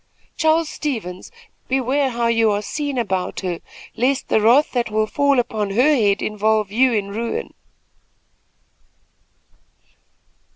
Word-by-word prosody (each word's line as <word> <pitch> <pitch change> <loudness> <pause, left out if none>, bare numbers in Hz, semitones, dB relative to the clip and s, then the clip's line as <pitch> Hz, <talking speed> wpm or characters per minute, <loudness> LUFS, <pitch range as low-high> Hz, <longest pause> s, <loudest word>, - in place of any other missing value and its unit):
Charles 320 0 +2
Stevens, 220 - -5 0.4
beware 265 +1 +1
how 235 -1 -2
you 230 -1 +3
are 205 0 -1
seen 285 +4 -3
about 190 -6 -2
her, 180 -3 -3 0.4
lest 265 +3 0
the 220 - +3
wrath 245 +7 +4
that 240 -3 -1
will 215 0 +1
fall 280 +4 +1
upon 220 -4 -1
her 255 +9 +3
head 205 -5 +1
involve 215 -1 0
you 255 +4 +3
in 205 -3 -1
ruin." 230 +3 -4
230 Hz, 125 wpm, -20 LUFS, 210-265 Hz, 0.4 s, wrath